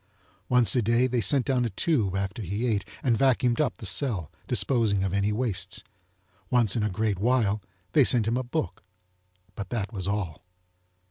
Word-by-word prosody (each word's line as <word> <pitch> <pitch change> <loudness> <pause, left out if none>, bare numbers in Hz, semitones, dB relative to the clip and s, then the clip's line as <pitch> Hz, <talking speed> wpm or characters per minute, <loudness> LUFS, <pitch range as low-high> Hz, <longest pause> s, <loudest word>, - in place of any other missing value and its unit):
Once 125 -1 +5
a 125 - +3
day 115 +3 +2
they 125 -2 0
sent 125 +6 +2
down 130 -3 +1
a 120 - -1
tube 105 - 0
after 100 +3 -3
he 100 +5 -3
ate 105 -5 0 0.2
and 120 -4 +3
vacuumed 125 -3 +2
up 145 - -1
the 110 - -9
cell, 95 - 0 0.2
disposing 110 -7 +1
of 95 -1 -2
any 100 +1 +1
wastes. 110 -3 -1 0.7
Once 120 -5 +3
in 115 - 0
a 105 - 0
great 105 0 -1
while 110 -2 +1 0.3
they 145 - +5
sent 120 -3 +3
him 115 - +1
a - - 0
book, 140 +5 -4 0.7
but 100 -3 -7
that 115 -1 -3
was 95 -3 -4
all. 100 -6 -3
110 Hz, 185 wpm, -26 LUFS, 100-125 Hz, 0.7 s, Once